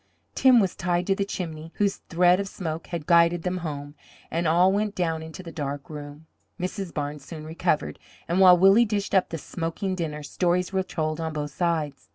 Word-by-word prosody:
Tim 255 -2 +6
was 190 -4 +1
tied 175 0 0
to 195 - +2
the 200 - 0
chimney, 165 -5 -6
whose 200 -1 +1
thread 180 +2 +3
of 200 - -2
smoke 165 -4 -5
had 170 -4 -5
guided 170 0 +4
them 185 0 -1
home, 145 -4 -5 0.4
and 165 0 0
all 175 +4 +4
went 210 0 -1
down 165 -3 -1
into 160 +4 -9
the 165 - -8
dark 145 -2 -5
room. 145 +1 -9 0.3
Mrs. 185 0 -4
Barnes 145 -1 -4
soon 155 +1 -9
recovered, 160 0 -1 0.3
and 175 +3 +1
while 180 -2 +8
Willie 195 +6 +6
dished 205 -3 -2
up 190 -2 +3
the 165 - -4
smoking 165 +4 -4
dinner, 155 -4 -4
stories 180 +5 0
were 190 - +2
told 155 -3 -3
on 160 -1 -3
both 150 -1 -4
sides. 155 -3 -2
170 Hz, 200 wpm, -25 LUFS, 155-185 Hz, 0.4 s, while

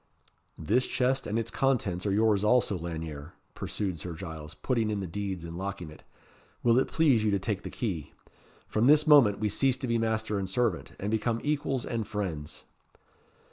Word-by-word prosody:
"This 110 +11 +1
chest 130 +1 0
and 105 - -1
its 115 - -2
contents 105 -9 0
are - - +1
yours 105 0 +3
also, 110 -1 +3
Lanyere," 80 -3 -6 0.2
pursued 95 -5 -3
Sir 85 +3 -5
Giles, 80 -3 -8
putting 115 -4 0
in 105 -1 -1
the 95 - -3
deeds, 95 0 -4
and 85 0 -7
locking 95 -4 -5
it. 75 - -15 0.6
"Will 120 +1 +5
it 130 - +1
please 140 -9 +3
you 110 - +2
to 100 - +2
take 100 0 -2
the - - -6
key. 90 - -4 0.5
From 110 +3 +1
this 150 +1 +6
moment 135 -10 +6
we 105 - 0
cease 130 +5 +2
to 130 - -4
be 115 -1 +1
master 110 -2 0
and 95 -1 -3
servant, 110 -3 -1
and 100 +2 -2
become 115 +1 0
equals 145 -4 -1
and 115 -3 -3
friends!" 85 -8 -4
105 Hz, 185 wpm, -29 LUFS, 90-120 Hz, 0.6 s, this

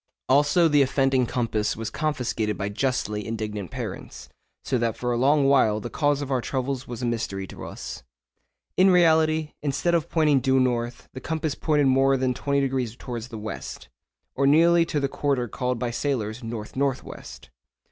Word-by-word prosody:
Also 145 +5 +4
the 145 -2 +4
offending 135 -1 +2
compass 110 -4 -1
was 110 -1 -4
confiscated 125 -9 -1
by 100 0 -2
justly 105 -2 -1
indignant 105 -3 -4
parents, 60 0 -7 0.3
so 125 - 0
that 115 -1 -1
for 125 0 -2
a - - +1
long 140 +4 +3
while 130 -6 +4
the 120 +3 -7
cause 145 -1 +1
of 140 - -6
our 130 -2 +1
troubles 130 +1 -3
was 120 0 -6
a - - +1
mystery 110 -5 -2
to - - -10
us. - - -7 0.7
In 190 +1 +5
reality, 160 -3 +3
instead 150 +4 0
of 170 -1 +1
pointing 150 -4 +3
due 130 0 +2
north, 120 -1 -1
the 130 - -8
compass 155 +1 -2
pointed 150 -2 +1
more 135 +1 +4
than 130 -1 0
20° 135 -4 -1
towards 120 -3 -6
the 115 -3 -8
west, 105 - -7 0.4
or 140 - +1
nearly 165 +3 +5
to 150 - -1
the 140 - 0
quarter 135 -3 -1
called 125 +2 -2
by 120 0 -2
sailors 120 -3 -2
north 115 -2 -6
north 135 -1 0
west. - - -11
130 Hz, 180 wpm, -25 LUFS, 115-145 Hz, 0.7 s, In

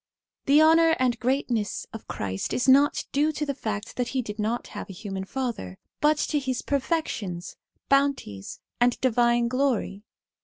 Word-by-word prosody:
The 290 +3 +6
honour 325 +1 +5
and 245 -2 +1
greatness 245 -4 -1
of 225 - -9
Christ 95 -1 -3
is 250 - 0
not 280 +2 +5
due 295 +3 +2
to 300 0 -2
the 280 - -2
fact 215 -5 -5
that 245 -1 0
he 255 - +1
did 210 -1 -7
not 225 +3 -2
have - - -7
a - - -7
human 190 0 -5
father, 230 - -4 0.2
but 300 0 +3
to 295 0 0
his 260 -3 -3
perfections, 260 - -2 0.3
bounties, 275 - 0 0.2
and 245 0 +3
divine 240 -1 +3
glory. 250 -6 0
245 Hz, 160 wpm, -26 LUFS, 210-280 Hz, 0.3 s, The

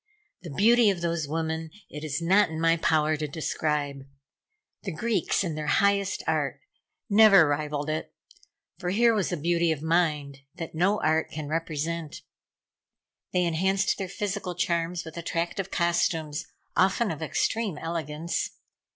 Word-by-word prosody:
The 175 - -8
beauty 225 - +5
of 185 -3 -1
those 170 -3 -1
women 160 +1 -2 0.2
it 150 +1 -8
is 155 +2 -3
not 195 +3 +4
in 160 0 -5
my 165 0 +3
power 155 -1 +2
to 150 0 -3
describe. 150 -2 -2 0.8
The 195 - -4
Greeks, 200 +2 0
in 170 -4 -2
their 150 0 -4
highest 200 +1 +2
art, - - -1 0.5
never 205 -6 +7
rivalled 145 0 -2
it, 155 0 -3 0.7
for 180 -2 -2
here 230 +5 +4
was 205 -4 0
a 175 - -1
beauty 170 +2 +1
of 155 -1 -3
mind 155 -4 0 0.2
that 165 - -6
no 185 +6 +2
art 160 +1 +2
can 155 -2 -6
represent. 160 0 -3 1.1
They 180 - +2
enhanced 190 +5 +1
their 190 -2 -3
physical 195 -2 -3
charms 170 0 -1
with 160 +1 -9
attractive 170 +3 -2
costumes, 165 -4 0 0.3
often 195 +3 +2
of 160 - -6
extreme 200 +3 -1
elegance. 165 0 -3
165 Hz, 145 wpm, -27 LUFS, 155-190 Hz, 1.1 s, never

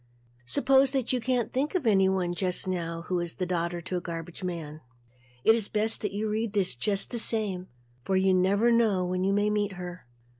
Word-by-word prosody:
Suppose 265 - +4
that 260 -2 0
you 250 - 0
can't 250 -1 -1
think 285 +7 -1
of 340 -8 0
anyone 190 -4 +2
just 180 +1 -2
now 170 -2 -3
who 180 0 -1
is 175 +1 -4
a 185 - 0
daughter 175 -1 -2
to 180 +2 -3
a - - -3
garbage 170 +1 -7
man, 160 -4 -5 0.6
it 220 - +6
is 225 -3 0
best 215 +1 -1
to 210 0 -2
read 215 0 -2
this 195 -3 +1
just 195 - -1
the 240 - -1
same 205 -5 +1 0.3
for 190 +9 0
you 190 0 +3
never 200 +6 +3
know 215 -6 +3
when 180 +1 -1
you 195 - +2
may 205 +1 +2
meet 205 -2 0
her. 180 -5 -8
190 Hz, 200 wpm, -28 LUFS, 180-220 Hz, 0.6 s, it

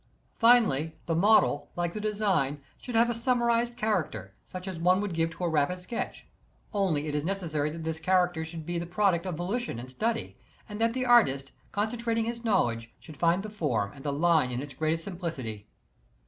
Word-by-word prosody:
Finally, 220 - +4
the 165 - 0
model, 170 -5 +4
like 175 -1 -1
the 215 - -4
design, 195 -10 0 0.2
should 245 - -6
have 230 +1 +5
a 240 - 0
summarized 235 0 +1
character, 150 - -1
such 185 +1 -8
as 185 -3 -5
one 180 +2 +4
would 205 -3 -2
give 165 0 +1
to 165 +2 -8
a - - +2
rapid 160 +3 +1
sketch. 180 +6 -5 0.5
Only 180 -8 +1
it 150 - -3
is 150 0 0
necessar) 160 -5 -1
that 165 +1 -7
this 160 0 -3
character 180 -2 +2
should 160 -1 -7
be 175 +1 -2
the 170 - -5
product 190 -1 +1
of 180 - -2
volition 195 - -2
and 125 +2 -7
study, 225 - -2 0.3
and 210 0 -6
that 230 0 +3
the 255 0 -1
artist, 140 - +4 0.2
concen 220 +3 -1
trating 230 -1 +1
his 235 0 -4
knowledge, 115 - +1
should 155 - -12
find 170 +5 +2
the 215 - -5
form 150 - -1
and 135 - -13
the 145 - -1
line 155 -2 +3
in 125 0 -3
its 140 0 -7
greatest 160 +1 -1
simplicity. 140 - -5
175 Hz, 200 wpm, -28 LUFS, 150-215 Hz, 0.5 s, have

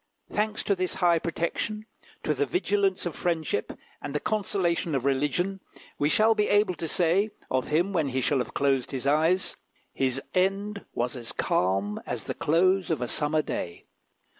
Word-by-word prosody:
Thanks 215 +1 -1
to 200 - +2
this 185 -1 -2
high 175 -3 +3
protection, 175 +6 -2 0.4
to 155 - +1
the 145 0 0
vigilance 195 +3 +1
of 175 - -3
friendship 160 -11 -1 0.2
and 145 - -5
the - - +2
consolation 175 -6 0
of 130 -1 -1
religion, 150 +8 +1 0.4
we 145 - +3
shall 220 +6 +5
be 210 -1 +1
able 205 -2 +4
to 165 - -4
say, 180 +6 +2 0.2
of 130 -1 +1
him 175 +6 +1
when 160 -5 +1
he 130 0 -1
shall 135 +2 +1
have 125 - -4
closed 135 -2 +2
his 135 -1 -4
eyes, 160 +6 +2 0.4
"His 130 -1 0
end 195 +2 0
was 120 +2 -1
as 120 -2 -6
calm 95 +3 0
as - - -3
the - - -3
close 185 +4 +2
of 160 -5 +1
a 125 - -2
summer 150 +4 +1
day." 85 -10 -5
165 Hz, 175 wpm, -27 LUFS, 140-195 Hz, 0.4 s, shall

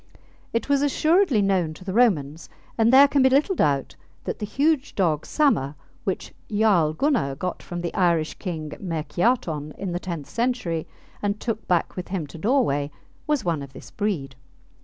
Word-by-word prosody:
It 230 - -1
was 280 -1 +2
assuredly 310 - +3
known 180 -5 +1
to 185 - -13
the 190 - -3
Romans, 165 - +2 0.3
and 225 0 +3
there 275 +2 +8
can 280 0 +2
be 260 - +6
little 285 +9 +3
doubt 140 - 0 0.3
that - - -4
the 210 - -3
huge 285 +4 +1
dog 160 -6 +1
Samr, 150 - +1 0.3
which 190 - -3 0.2
Jarl 200 -8 +3
Gunnar 225 - +1
got 180 +6 -4
from 175 -1 -6
the 170 - -3
Irish 170 -4 +2
king 160 -5 -5
Myrkiarton 165 - -1
in 195 -2 -4
the 175 - -2
tenth 170 -6 -5
century 230 -9 -1 0.3
and 205 0 -1
took 225 -1 -4
back 175 -2 +1
with 180 - -5
him 180 -5 -3
to 155 - -11
Norway, 200 - +1 0.4
was 295 -8 0
one 165 -4 0
of 140 -1 -9
this - - -12
breed. 165 -11 -2
190 Hz, 175 wpm, -24 LUFS, 155-245 Hz, 0.4 s, there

